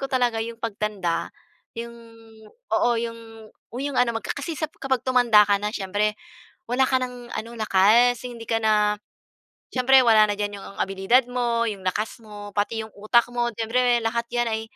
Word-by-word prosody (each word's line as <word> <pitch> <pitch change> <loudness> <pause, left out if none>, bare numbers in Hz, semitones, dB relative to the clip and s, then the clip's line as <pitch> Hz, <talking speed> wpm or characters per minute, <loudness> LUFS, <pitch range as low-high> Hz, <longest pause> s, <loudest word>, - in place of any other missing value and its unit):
ko 275 - -3
talaga 245 -3 +1
yung 230 +1 -5
pagtanda, 210 -5 -2 0.5
yung 235 0 -6 0.8
oo, 240 - +3
yung 225 -2 -8 0.3
yung 275 0 -3
ano 235 -2 +1
kasi 310 +2 -4
sa 310 - -2
kapag 265 -3 0
tumanda 240 -5 +5
ka 205 0 +2
na 210 - -1
syempre 210 +1 -1 0.6
wala 260 +1 +3
ka 260 - +2
ng 245 -1 -7
ano 225 +1 -5
lakas, 220 +5 +4
hindi 235 -2 -8
ka 225 0 +1
na 210 -1 +3 0.8
syempre 260 +1 +5
wala 220 -2 +6
na 205 - 0
dyan 205 -1 -3
yung 195 - -11
abilidad 195 +6 +2
mo, 235 -2 0
yung 200 -3 -4
lakas 215 +5 -2
mo, 205 -1 -10
pati 210 +2 -1
yung 220 - -15
utak 225 +3 +3
mo, 240 0 0
siyempre 240 +2 +2
lahat 235 +1 0
yan 240 0 +1
ay 220 0 -2
230 Hz, 170 wpm, -24 LUFS, 210-245 Hz, 0.8 s, wala